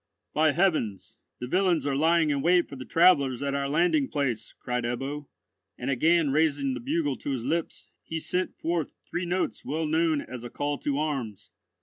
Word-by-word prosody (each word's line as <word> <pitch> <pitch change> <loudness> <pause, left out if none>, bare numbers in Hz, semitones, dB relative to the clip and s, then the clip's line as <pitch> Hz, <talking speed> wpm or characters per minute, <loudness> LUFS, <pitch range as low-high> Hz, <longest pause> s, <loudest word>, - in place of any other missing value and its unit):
"By 155 -1 +3
heavens, 155 - 0 0.2
the 125 - -4
villains 180 +3 +1
are 140 -1 0
lying 160 +1 +3
in 140 -1 0
wait 175 +2 +4
for - - -9
the 130 -1 -8
travellers 140 -7 +4
at 140 0 -1
our 140 0 -1
landing 175 - +2
place," 125 - -2
cried 125 -1 -2
Ebbo, 135 +4 -3 0.5
and - - -2
again 160 +2 +3
raising 145 -2 +2
the 125 - -4
bugle 145 +2 -1
to - - -6
his 130 -4 -2
lips, 165 +4 -2
he 160 - -4
sent 180 +3 -2
forth 165 -2 -2
three 175 0 -3
notes 180 +2 -1
well 155 +4 -2
known 160 0 +2
as 125 -2 -8
a 120 - -6
call 145 +2 -2
to 140 -1 -1
arms. 135 -9 -3
145 Hz, 190 wpm, -27 LUFS, 135-165 Hz, 0.5 s, wait